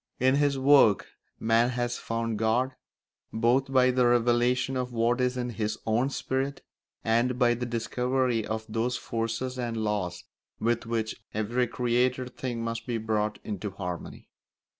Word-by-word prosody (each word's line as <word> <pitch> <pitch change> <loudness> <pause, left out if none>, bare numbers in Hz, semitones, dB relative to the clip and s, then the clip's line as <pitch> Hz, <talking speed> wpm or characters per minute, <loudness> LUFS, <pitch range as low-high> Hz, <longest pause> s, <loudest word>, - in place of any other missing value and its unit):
In 130 +1 +4
his 145 -1 +2
work 135 -7 +5 0.3
man 115 +2 +3
has 120 -1 -2
found 115 -1 -2
God, 120 +4 +1 0.6
both 125 +4 +2
by 130 -1 +5
the 125 -1 +3
revelation 120 +2 +2
of 125 -1 -2
what 120 +2 +1
is 125 0 +1
in 125 -1 -2
his 110 -1 -2
own 120 +5 +2
spirit 135 0 -2 0.4
and 120 +3 +2
by 120 -2 +4
the 120 +1 -3
discovery 125 +1 0
of 110 +1 -4
those 115 +3 -1
forces 115 +3 -3
and 120 -2 -2
laws 100 -5 -2 0.4
with 115 0 0
which 115 -2 -2
every 120 +4 0
created 125 +1 0
thing 120 -3 -3
must 115 0 -4
be 120 -2 -1
brought 110 -1 -1
into 105 -1 -4
harmony. 90 -3 -6
120 Hz, 150 wpm, -28 LUFS, 110-125 Hz, 0.6 s, work